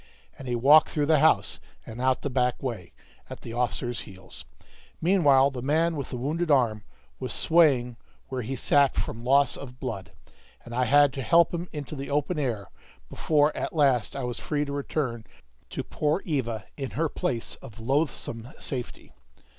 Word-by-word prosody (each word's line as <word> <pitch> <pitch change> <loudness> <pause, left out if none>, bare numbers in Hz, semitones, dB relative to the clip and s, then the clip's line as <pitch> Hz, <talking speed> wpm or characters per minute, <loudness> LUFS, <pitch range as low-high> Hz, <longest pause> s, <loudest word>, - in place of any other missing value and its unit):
And 135 - -10
he 120 - -1
walked 145 +6 +6
through 150 -2 0
the 155 0 +4
house, 160 +2 +3 0.3
and 115 +2 -8
out 130 0 +1
the 145 - -1
back 125 0 0
way, 115 -9 -5 0.4
at - - -9
the 115 - -8
officer's 120 0 -2
heels; 95 -1 -11 0.5
meanwhile 145 -7 +4
the 125 -2 -6
man 160 +5 +1
with 140 -3 -5
the 125 - -5
wounded 160 +7 -2
arm 115 -7 +2 0.4
was - - -4
swaying 135 -8 +3 0.3
where 130 -1 -3
he 125 +4 -4
sat 140 +1 +3
from 115 +1 -4
loss 140 +2 +3
of 130 -2 -10
blood, 100 -9 -5 0.5
and 120 - -9
I 125 +1 +1
had 145 +2 +5
to 135 - -4
help 165 +8 +4
him 175 +1 -4
into 150 -1 -6
the 140 0 -6
open 150 +3 0
air 110 - -3 0.4
before 150 -1 +2
at - - -4
last 135 -7 +2
I 135 - -3
was 125 -1 -4
free 150 -1 -1
to 140 - -6
return 140 -4 -3 0.5
to - - -4
poor 155 +5 -1
Eva 120 - -2
in 135 -3 -4
her 165 +1 +2
place 120 -4 -3
of 115 -4 -13
loathsome 120 -2 -2
safety. 125 -5 -6
135 Hz, 180 wpm, -26 LUFS, 120-150 Hz, 0.5 s, walked